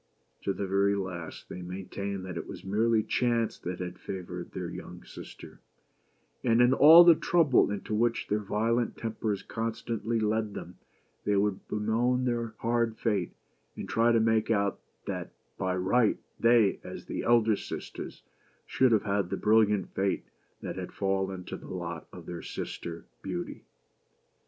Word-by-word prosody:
To - - -1
the 100 - -3
very 100 +1 +2
last, 90 -4 -5
they 90 - -7
maintained 95 +2 -5
that 95 - -6
it - - -5
was - - -8
merely 110 +3 +2
chance 120 -2 0
that 90 0 -4
had 90 0 -6
favored 90 -2 -6
their - - -4
younger - - -9
sister: - - -11 0.8
and 115 -1 +3
in 125 +1 +6
all 160 +5 +10
the 170 -1 +9
trouble 160 - +3
into 105 +1 -4
which 115 +2 +1
their 105 - +1
violent 115 +3 0
tempers 110 -3 -2
constantly 115 0 -2
led 110 -1 0
them, 90 - -8 0.4
they 105 - +1
would 100 -1 0
bemoan 120 +4 +1
their 120 -2 -1
hard 115 -1 +1
fate, 100 -6 0 0.4
and - - -6
try 115 +4 +3
to 115 - +4
make 110 -1 +2
out 100 -3 +1 0.3
that - - -5 0.3
by 95 -1 0
right, 105 +5 +3 0.2
they, 115 -4 +4
as - - -8
the - - -3
elder 115 -2 +4
sisters, - - -7 0.4
should 130 -2 +3
have 110 -3 +3
had 100 -3 0
the - - -2
brilliant 105 -3 +3
fate 95 0 0 0.4
that - - -5
had - - -5
fallen 95 -1 -1
to - - -6
the - - -12
lot 85 -3 -5
of 90 -2 -11
their 85 -1 -6
sister, 85 -1 -6 0.2
Beauty. 90 -2 -5
105 Hz, 160 wpm, -29 LUFS, 95-115 Hz, 0.8 s, all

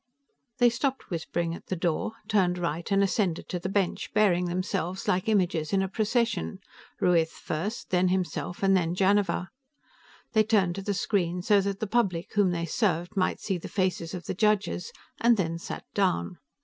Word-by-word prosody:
XVI 265 -2 -50
They 245 -1 +6
stopped 265 +3 -2
whispering 165 0 -2
at - - -10
the 185 - -1
door, 170 +4 -1
turned 185 -5 +2
right, 170 +1 -3
and 200 0 +4
ascended 190 -4 0
to 180 - -2
the 185 - -4
bench, 195 -2 -1
bearing 185 -4 +4
themselves 185 +1 -2
like 185 +4 +1
images 180 -6 +1
in 195 -1 +3
a - - -1
procession, 215 - 0 0.4
Ruiz 165 -2 +3
first, 195 +10 -4
then 180 0 +3
himself 180 0 -2
and 195 0 +5
then 175 -2 +1
Janiver. 195 -1 +2 0.8
They 220 - +5
turned 205 -5 +2
to 195 - -5
the 200 +1 -2
screen 180 -3 0
so 205 +1 +4
that 200 0 -2
the - - -1
public 195 -6 0
whom 205 -3 +3
they 170 -1 -1
served 175 0 0
might 185 - +1
see 190 -4 -2
the - - -7
faces 185 -3 -1
of 175 - -7
the - - -2
judges, 210 - +1 0.3
and 235 0 +4
then 165 -3 -1
sat - - -7
down. 180 - 0
190 Hz, 185 wpm, -27 LUFS, 175-210 Hz, 0.8 s, They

